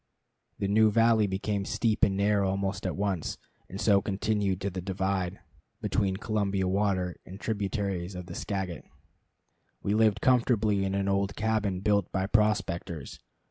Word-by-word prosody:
The 100 - -1
new 110 +2 +5
valley 115 -1 +4
became 100 +1 -2
steep 110 +2 0
and 95 -1 +4
narrow 100 -1 +2
almost 95 +1 -2
at - - -2
once, 95 -5 -2 0.3
and 95 - -7
so 100 -2 +4
continued 100 -2 0
to 100 0 -2
the 90 0 -4
divide 95 -1 -2 0.4
between 95 -3 0
Columbia 100 -3 0
water 95 -2 0
and 95 +2 -10
tributaries 100 -4 -2
of 90 0 -6
the - - -8
Skagit. 95 -5 -4 1.0
We 100 - 0
lived 110 -1 +3
comfortably 110 -5 +2
in 95 0 -1
an 100 0 0
old 100 0 0
cabin 105 -4 0
built 100 -2 +1
by 95 -1 0
prospectors. 95 - 0
100 Hz, 150 wpm, -28 LUFS, 95-105 Hz, 1.0 s, new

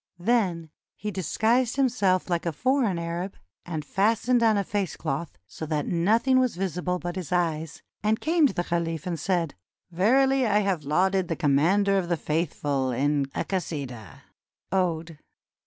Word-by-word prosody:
Then 175 -6 0 0.2
he 210 - -4
dis 185 -5 -4
guised 240 +2 +2
himself 230 -9 +2
Hke 175 -1 -1
a - - +1
foreign 245 - +1
Arab, 170 +3 -4 0.3
and 160 -3 -4
fastened 225 - +2
on 220 -2 +4
a 200 - +1
face 200 -2 -2
cloth, 155 - -4
so 160 +11 -8
that 150 -2 -1
nothing 225 +9 +3
was 255 -5 +1
visible 180 -1 -2
but 175 0 -5
his 185 -3 -5
eyes, 165 -3 -1 0.2
and 215 +1 +1
came 320 -1 +3
to 240 - -5
the 175 - -1
caliph 165 -2 -2
and 170 -3 -3
said: 170 -2 0 0.4
"Verily 260 +8 +3
I 210 0 +3
have 190 -7 -1
lauded 185 +5 +2
the 165 - -1
Commander 175 +7 +3
of 175 -2 -4
the 170 - +1
Faithful 145 -4 -1
in 140 +2 +1
a - - -1
'Kasidah'" 135 - -5 0.5
(ode). 165 -4 -1
180 Hz, 165 wpm, -26 LUFS, 160-210 Hz, 0.5 s, on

